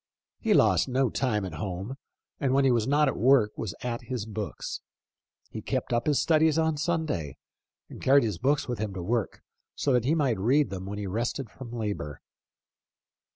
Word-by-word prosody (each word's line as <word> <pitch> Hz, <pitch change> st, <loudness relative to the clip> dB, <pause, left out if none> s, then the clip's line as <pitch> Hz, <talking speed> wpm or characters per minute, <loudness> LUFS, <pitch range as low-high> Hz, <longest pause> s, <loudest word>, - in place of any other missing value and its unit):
He -, -, +2 dB
lost -, -, +4 dB
no 130 Hz, 0 st, +1 dB
time 105 Hz, -7 st, 0 dB
at 90 Hz, -, -6 dB
home, 95 Hz, +4 st, -4 dB, 0.5 s
and 135 Hz, -1 st, +1 dB
when 140 Hz, 0 st, +4 dB
he 130 Hz, -, +5 dB
was 115 Hz, -2 st, +1 dB
not 145 Hz, +2 st, +3 dB
at -, -, 0 dB
work 125 Hz, -4 st, +4 dB
was 105 Hz, -6 st, -4 dB
at 120 Hz, -1 st, -3 dB
his 125 Hz, -5 st, -3 dB
books. 110 Hz, -1 st, -5 dB, 0.7 s
He -, -, -6 dB
kept -, -, -2 dB
up 120 Hz, +3 st, 0 dB
his 145 Hz, -4 st, +3 dB
studies 160 Hz, -1 st, +3 dB
on 160 Hz, -1 st, +2 dB
Sunday, 150 Hz, -, -2 dB, 0.5 s
and -, -, -11 dB
carried 140 Hz, +1 st, +5 dB
his 105 Hz, -7 st, -2 dB
books 140 Hz, +2 st, +1 dB
with 120 Hz, -4 st, -3 dB
him 105 Hz, -2 st, -3 dB
to 90 Hz, -, -4 dB
work, 115 Hz, +3 st, -2 dB, 0.3 s
so 140 Hz, -, +1 dB
that 125 Hz, -2 st, +2 dB
he 150 Hz, +5 st, +3 dB
might 135 Hz, -10 st, +1 dB
read 135 Hz, +7 st, +2 dB
when 95 Hz, +2 st, -5 dB
he 105 Hz, -, -4 dB
rested 115 Hz, +4 st, -3 dB
from 125 Hz, -2 st, -10 dB
labor." 100 Hz, -, -4 dB
120 Hz, 190 wpm, -27 LUFS, 105-140 Hz, 0.7 s, he